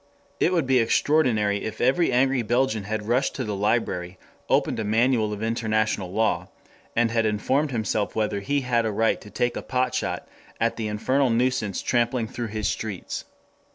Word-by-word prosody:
It 175 Hz, -, +3 dB
would 170 Hz, -6 st, +1 dB
be 130 Hz, -1 st, +3 dB
extraordinary 115 Hz, -5 st, +2 dB
if 110 Hz, -, -5 dB
every 135 Hz, +7 st, +3 dB
angry 130 Hz, +1 st, +3 dB
Belgian 120 Hz, -2 st, 0 dB
had 105 Hz, 0 st, -3 dB
rushed 125 Hz, +4 st, +1 dB
to 130 Hz, -, -2 dB
the 105 Hz, -3 st, -3 dB
library, 95 Hz, -4 st, -1 dB, 0.3 s
opened -, -, +2 dB
a -, -, -1 dB
manual 110 Hz, +1 st, +2 dB
of 105 Hz, +1 st, -4 dB
international 110 Hz, -4 st, 0 dB
law, 110 Hz, +3 st, 0 dB, 0.5 s
and 115 Hz, -1 st, +2 dB
had 115 Hz, -1 st, +2 dB
informed 130 Hz, +8 st, +1 dB
himself 110 Hz, -4 st, -1 dB
whether 105 Hz, -2 st, 0 dB
he 140 Hz, +8 st, 0 dB
had 120 Hz, -2 st, +1 dB
a -, -, -1 dB
right 110 Hz, +2 st, +1 dB
to 105 Hz, -, -12 dB
take 120 Hz, +4 st, 0 dB
potshot 125 Hz, -1 st, -1 dB, 0.3 s
at 115 Hz, +1 st, +1 dB
the 110 Hz, -2 st, -3 dB
infernal 130 Hz, +6 st, +1 dB
nuisance 115 Hz, -4 st, 0 dB
tramping 120 Hz, -1 st, +1 dB
through 120 Hz, +1 st, -5 dB
his 105 Hz, -1 st, -2 dB
streets. 105 Hz, -5 st, -4 dB
115 Hz, 170 wpm, -25 LUFS, 105-125 Hz, 0.5 s, It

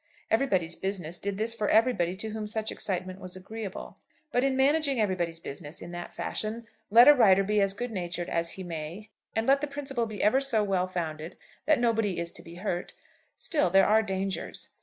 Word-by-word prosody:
'Everybody's 190 Hz, -9 st, +1 dB
Business' 180 Hz, -3 st, -3 dB
did 200 Hz, -1 st, -3 dB
this 225 Hz, +2 st, 0 dB
for 215 Hz, -2 st, -1 dB
everybody 205 Hz, -6 st, +3 dB
to 220 Hz, +3 st, -4 dB
whom 215 Hz, 0 st, -4 dB
such 220 Hz, 0 st, -3 dB
excitement 185 Hz, -1 st, -3 dB
was 185 Hz, -1 st, -7 dB
agreeable. 200 Hz, +1 st, -7 dB, 0.3 s
But 245 Hz, -1 st, +2 dB
in 270 Hz, -1 st, +1 dB
managing 280 Hz, -1 st, +2 dB
everybody's 175 Hz, -5 st, -1 dB
business 150 Hz, 0 st, -7 dB
in 175 Hz, -, -8 dB
that 175 Hz, 0 st, -6 dB
fashion, 225 Hz, +2 st, -4 dB, 0.2 s
let 235 Hz, +5 st, +8 dB
a 295 Hz, -, +11 dB
writer 195 Hz, -7 st, +5 dB
be 210 Hz, +1 st, +2 dB
as 195 Hz, 0 st, +2 dB
good 245 Hz, +3 st, -4 dB
natured 175 Hz, -3 st, -3 dB
as 170 Hz, 0 st, -1 dB
he 190 Hz, -, -7 dB
may 175 Hz, +5 st, -7 dB, 0.2 s
and 225 Hz, 0 st, 0 dB
let 275 Hz, +2 st, +4 dB
the 295 Hz, -, -1 dB
principle 275 Hz, -4 st, -3 dB
be 215 Hz, -2 st, -4 dB
ever 240 Hz, +6 st, +4 dB
so 240 Hz, -6 st, +4 dB
well 190 Hz, -2 st, 0 dB
founded 165 Hz, -2 st, -5 dB, 0.3 s
that 310 Hz, -4 st, +4 dB
nobody 225 Hz, -5 st, +1 dB
is 170 Hz, 0 st, -3 dB
to -, -, -7 dB
be 170 Hz, -, -12 dB
hurt, 180 Hz, -1 st, -3 dB, 0.4 s
still 290 Hz, -, +1 dB
there 195 Hz, +2 st, +5 dB
are 220 Hz, +1 st, +5 dB
dangers. 195 Hz, -2 st, -4 dB
200 Hz, 200 wpm, -28 LUFS, 180-230 Hz, 0.4 s, a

